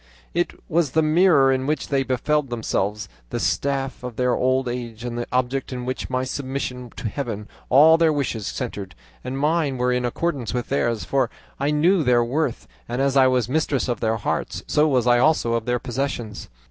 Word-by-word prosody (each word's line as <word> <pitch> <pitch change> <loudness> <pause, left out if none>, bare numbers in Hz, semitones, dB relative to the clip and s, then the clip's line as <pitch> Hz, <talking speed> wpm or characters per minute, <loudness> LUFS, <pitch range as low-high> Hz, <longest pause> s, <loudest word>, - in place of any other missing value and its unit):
"I 175 0 +2 0.2
was 155 -4 +1
the 160 - +3
mirror 155 -4 +5
in 130 0 0
which 150 +1 -1
they 140 -1 +2
beheld 135 +2 0
themselves, 105 -3 -2 0.2
the - - -3
staff 135 -2 -1
of 125 -2 -6
their 125 +1 +1
old 130 0 +1
age, 120 -2 -5
and 120 -1 -4
the 120 0 -3
object 130 +2 -1
in 125 -1 -4
which, 130 +1 -4
with 130 0 -1
submission 130 -2 -4
to - - -4
Heaven, 105 -3 -4 0.2
all 155 +5 +7
their 165 -1 +4
wishes 130 -8 -2
centred, 105 -7 -5 0.3
and 130 +1 -4
mine 150 -1 +1
were 125 0 +1
in 125 0 0
accordance 125 -2 -2
with 120 -1 -3
theirs, 120 -5 0
for 135 -4 +1 0.3
I 140 +2 +1
knew 165 +5 +3
their 125 -4 +3
worth; 135 +1 -2 0.2
and 120 - -2
as 135 0 +1
I 135 -1 +6
was 125 -3 +1
mistress 140 -1 0
of 120 - -1
their 110 0 0
hearts, 105 - -3
so 150 +1 +3
was 130 -5 +2
I 120 -1 +5
also 130 -4 +3
of 115 -1 -1
their 125 0 +1
possessions. 120 -3 -4
130 Hz, 200 wpm, -23 LUFS, 120-140 Hz, 0.3 s, all